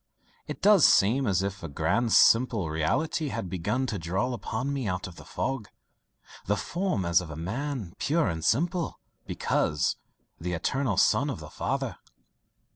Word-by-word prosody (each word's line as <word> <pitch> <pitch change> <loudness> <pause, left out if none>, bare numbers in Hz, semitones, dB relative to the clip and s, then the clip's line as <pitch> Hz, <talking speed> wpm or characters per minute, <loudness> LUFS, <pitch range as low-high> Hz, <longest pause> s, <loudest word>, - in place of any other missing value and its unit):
It - - -7
does 205 -5 +6
seem 120 +7 +5
as 95 -1 +2
if 95 0 -4
a 85 - -5
grand 95 +11 0
simple 115 -10 +4
reality 150 - 0
had 95 -9 -4
begun 105 +9 -1
to 110 -6 -3
dawn 95 +10 -1
upon 125 +3 -3
me 135 -5 -2
out 90 -1 -2
of 90 - -9
the - - -12
fog 135 -6 -3 0.8
the 105 +1 +1
form 170 - -2
as 85 0 +4
of 90 - -8
a 75 - -7
man 110 - -4
pure 160 -1 +1
and 80 -3 -3
simple, 170 - 0 0.3
because 75 -1 0 0.4
the 90 +2 -3
eternal 115 +5 -1
son - - +3
of - - -4
the - - -10
Father." - - -3
105 Hz, 165 wpm, -27 LUFS, 90-135 Hz, 0.8 s, does